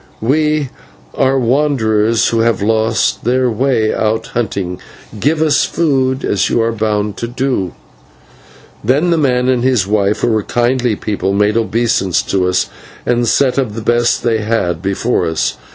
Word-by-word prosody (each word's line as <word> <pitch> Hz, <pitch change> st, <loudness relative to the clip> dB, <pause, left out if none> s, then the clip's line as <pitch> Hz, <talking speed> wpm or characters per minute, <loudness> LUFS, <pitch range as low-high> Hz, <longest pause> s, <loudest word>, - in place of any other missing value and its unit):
"We 150 Hz, +3 st, +1 dB, 0.4 s
are 135 Hz, 0 st, +1 dB
wanderers 115 Hz, -4 st, +1 dB
who 115 Hz, -, 0 dB
have 115 Hz, -3 st, +1 dB
lost 110 Hz, +1 st, +1 dB
our 125 Hz, 0 st, +2 dB
way 115 Hz, -2 st, +1 dB
out 110 Hz, +1 st, -1 dB
hunting. 95 Hz, -6 st, -3 dB, 0.4 s
Give 155 Hz, +6 st, +1 dB
us 155 Hz, -2 st, +3 dB
food, 135 Hz, -5 st, 0 dB
as 100 Hz, -, 0 dB
you -, -, +1 dB
are 115 Hz, -, 0 dB
bound 105 Hz, -2 st, -2 dB
to 120 Hz, -, -3 dB
do." 125 Hz, -, -2 dB, 1.1 s
Then 145 Hz, +10 st, +2 dB
the 165 Hz, -, +2 dB
man 125 Hz, -3 st, +1 dB
and 125 Hz, -2 st, +1 dB
his 125 Hz, -6 st, +2 dB
wife, 100 Hz, 0 st, 0 dB
who 120 Hz, -, +2 dB
were 110 Hz, -2 st, +1 dB
kindly 120 Hz, +1 st, 0 dB
people, 100 Hz, -2 st, -2 dB
made 105 Hz, +1 st, +2 dB
obeisance 110 Hz, -4 st, +1 dB
to 95 Hz, -2 st, 0 dB
us, 90 Hz, +1 st, +1 dB, 0.4 s
and 120 Hz, -1 st, +1 dB
set 135 Hz, +2 st, +2 dB
of 115 Hz, -6 st, -2 dB
the 115 Hz, -, -5 dB
best 120 Hz, +1 st, +1 dB
they 115 Hz, -2 st, +1 dB
had 100 Hz, -6 st, -1 dB
before 100 Hz, +5 st, 0 dB
us. 80 Hz, -1 st, -1 dB
115 Hz, 160 wpm, -15 LUFS, 105-130 Hz, 1.1 s, us